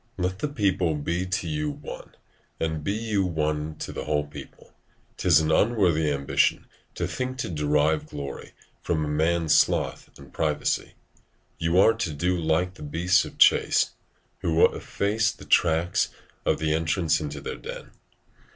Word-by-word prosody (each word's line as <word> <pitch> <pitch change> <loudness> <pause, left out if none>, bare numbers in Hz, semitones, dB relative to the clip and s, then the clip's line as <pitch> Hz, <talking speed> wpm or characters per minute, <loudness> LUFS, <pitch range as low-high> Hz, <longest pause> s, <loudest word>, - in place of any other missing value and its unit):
Let 95 +1 -2
the 150 - -1
people 95 - 0
be 85 +5 -2
to 95 +1 -2
you 150 0 -1
one, 145 0 -9 0.4
and 80 -2 -2
be 100 - -1
you 110 -2 0
one 75 -3 -2
to - - -6
the - - -6
whole 75 -1 0
people. 75 - -12 0.4
'Tis 85 -4 +5
an 80 0 0
unworthy 85 -6 +3
ambition 70 -1 +1 0.3
to - - -2
think 130 0 -4
to 130 - -3
derive 75 -1 +1
glory 70 -1 -7 0.3
from 80 -3 -1
a - - -4
man's 80 +1 +1
sloth - - +1
and - - -15
privacy: 75 -2 -1 0.7
you 85 +2 +1
are 110 +4 +6
to 110 -9 -3
do 90 +5 0
like 85 +2 0
the 85 - -15
beasts 85 +5 +2
of - - -11
chase, - - +4 0.5
who 80 0 +4
efface 110 +3 0
the - - -13
track 80 +2 +2 0.5
at - - +3
the 80 -1 0
entrance 80 0 +1
into 75 -1 -5
their 70 - -6
den. - - -9
85 Hz, 160 wpm, -25 LUFS, 75-95 Hz, 0.7 s, are